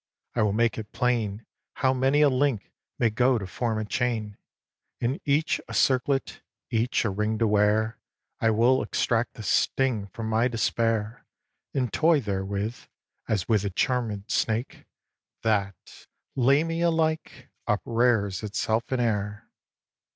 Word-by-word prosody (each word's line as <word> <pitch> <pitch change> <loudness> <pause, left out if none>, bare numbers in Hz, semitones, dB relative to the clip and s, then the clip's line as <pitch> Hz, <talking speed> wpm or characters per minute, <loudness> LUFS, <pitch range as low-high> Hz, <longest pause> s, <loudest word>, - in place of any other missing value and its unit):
I - - 0
will 105 -1 +2
make 115 +1 +1
it 105 -1 -8
plain 115 -4 -1 0.3
How 130 0 +1
many 135 +3 +2
a 145 - +6
link 130 -5 0 0.3
may 115 - +2
go 125 +3 +3
to 100 - -4
form 115 +3 -2
a 110 - -2
chain, 110 -3 -2 0.6
And 130 +9 -1
each 145 +2 +1
a - - -6
circlet, 135 +1 +1 0.3
each 115 +2 +1
a 105 - +1
ring 105 +3 -1
to 115 - +2
wear. 105 +1 +2 0.4
I 115 - +2
will 120 +4 +3
extract 115 0 0
the 110 - -8
sting 115 -1 +1
from 110 +3 -6
my 110 +2 +2
despair 115 -1 -1 0.5
And 125 -5 -1
toy 160 -1 +4
therewith, 100 0 -3 0.5
as 105 -4 -1
with 110 -4 +2
a 100 - -1
charmèd 110 -1 -1
snake, 115 +3 -1 0.6
That, 100 -5 -2 0.3
Lamia 160 +6 +2
like, 160 -1 -1 0.2
uprears 115 -5 +1
itself 110 +2 -1
in 130 - 0
air. 105 -3 -2
115 Hz, 140 wpm, -26 LUFS, 105-130 Hz, 0.6 s, a